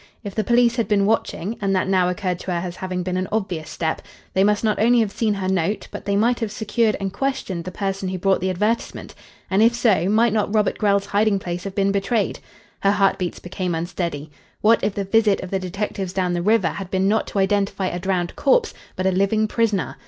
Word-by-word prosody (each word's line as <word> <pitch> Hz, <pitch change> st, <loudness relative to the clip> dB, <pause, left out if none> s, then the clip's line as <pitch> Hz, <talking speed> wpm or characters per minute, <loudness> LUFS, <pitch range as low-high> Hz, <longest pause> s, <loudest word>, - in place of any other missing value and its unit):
If 200 Hz, -2 st, -6 dB
the 215 Hz, -, 0 dB
police 240 Hz, +2 st, +3 dB
had 230 Hz, -, 0 dB
been 200 Hz, -2 st, +2 dB
watching 220 Hz, -1 st, -1 dB
and 195 Hz, -1 st, +1 dB
that 185 Hz, -, +1 dB
now 185 Hz, -2 st, +2 dB
occurred 180 Hz, 0 st, -2 dB
to 185 Hz, -, -5 dB
her 175 Hz, -, 0 dB
as 175 Hz, 0 st, -8 dB
having 185 Hz, -1 st, -3 dB
been 185 Hz, 0 st, -2 dB
an 185 Hz, 0 st, -1 dB
obvious 190 Hz, -7 st, -2 dB
step 160 Hz, -1 st, -2 dB, 0.3 s
they 190 Hz, -, +3 dB
must 210 Hz, +1 st, +2 dB
not 215 Hz, -2 st, +1 dB
only 240 Hz, +2 st, +5 dB
have 220 Hz, -3 st, +1 dB
seen 215 Hz, 0 st, 0 dB
her 190 Hz, -1 st, -3 dB
note, 190 Hz, +2 st, -1 dB
but -, -, -8 dB
they 200 Hz, 0 st, 0 dB
might 235 Hz, +4 st, +2 dB
have 225 Hz, -3 st, -2 dB
secured 220 Hz, +1 st, 0 dB
and 195 Hz, -1 st, -3 dB
questioned 235 Hz, -11 st, -2 dB
the 185 Hz, -, -5 dB
person 195 Hz, 0 st, -3 dB
who 185 Hz, -, -3 dB
brought 190 Hz, +1 st, +1 dB
the 190 Hz, -, 0 dB
advertisement. 210 Hz, +6 st, -2 dB, 0.3 s
And 195 Hz, +2 st, +2 dB
if 230 Hz, +1 st, +5 dB
so, 205 Hz, -7 st, +2 dB
might 225 Hz, +1 st, +3 dB
not 210 Hz, -2 st, 0 dB
Robert 210 Hz, -2 st, +1 dB
Grell's 200 Hz, -2 st, +2 dB
hiding 205 Hz, 0 st, +2 dB
place 175 Hz, -1 st, -5 dB
have 195 Hz, -1 st, -5 dB
been 195 Hz, 0 st, +2 dB
betrayed? 200 Hz, +2 st, 0 dB, 0.4 s
Her 200 Hz, 0 st, +3 dB
heartbeats 195 Hz, -3 st, +1 dB
became 180 Hz, -1 st, -3 dB
unsteady. 165 Hz, -3 st, -4 dB, 0.3 s
What 225 Hz, +2 st, +4 dB
if 205 Hz, -, 0 dB
the 200 Hz, -, -1 dB
visit 210 Hz, 0 st, +3 dB
of 180 Hz, -, -7 dB
the 195 Hz, -, 0 dB
detectives 190 Hz, 0 st, -4 dB
down 180 Hz, -2 st, 0 dB
the 175 Hz, -, -1 dB
river 210 Hz, -1 st, +3 dB
had 195 Hz, -2 st, -6 dB
been 190 Hz, +1 st, +1 dB
not 220 Hz, +2 st, +1 dB
to -, -, -5 dB
identify 195 Hz, 0 st, +1 dB
a 180 Hz, -1 st, -2 dB
drowned 180 Hz, -1 st, -1 dB
corpse, 485 Hz, -3 st, +2 dB, 0.2 s
but 185 Hz, -, -3 dB
a 190 Hz, -, +3 dB
living 200 Hz, +4 st, +2 dB
prisoner? 215 Hz, -4 st, 0 dB
195 Hz, 230 wpm, -22 LUFS, 185-215 Hz, 0.4 s, only